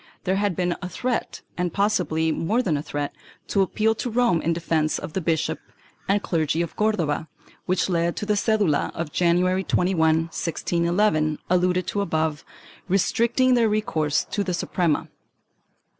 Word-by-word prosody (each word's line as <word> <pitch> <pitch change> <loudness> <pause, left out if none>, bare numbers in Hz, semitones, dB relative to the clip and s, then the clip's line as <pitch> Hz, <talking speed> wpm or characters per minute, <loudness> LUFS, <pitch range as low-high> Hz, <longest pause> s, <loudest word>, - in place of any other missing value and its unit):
There 190 +1 +1
had 200 -3 0
been 175 0 0
a 180 - -4
threat, 245 +6 -3 0.2
and 180 -1 0
possibly 160 -5 +1
more 220 +11 0
than 170 -8 +1
a 145 - -1
threat, 145 -1 -4 0.4
to 200 - +2
appeal 215 +3 +2
to 245 - -4
Rome 230 -8 +2
in 165 - 0
defence 165 -2 0
of 155 - -7
the 190 - -1
bishop 160 -1 0 0.5
and 200 +1 +2
clergy 160 0 0
of 170 - -7
Cordova, 170 -8 0 0.4
which 185 0 +1
led 170 -2 0
to - - -4
the 210 - +1
cedula 205 -7 +1
of 165 -2 -4
January 180 +3 +2
21, 180 -1 +1
1611, 165 +1 +1
alluded 180 0 +2
to 205 - -1
above, 160 -4 -1 0.4
restricting 235 +6 +2
their 235 -3 +3
recourse 160 -8 0
to 205 - 0
the 180 -2 -1
Suprema. 170 -3 0
180 Hz, 160 wpm, -24 LUFS, 160-205 Hz, 0.5 s, their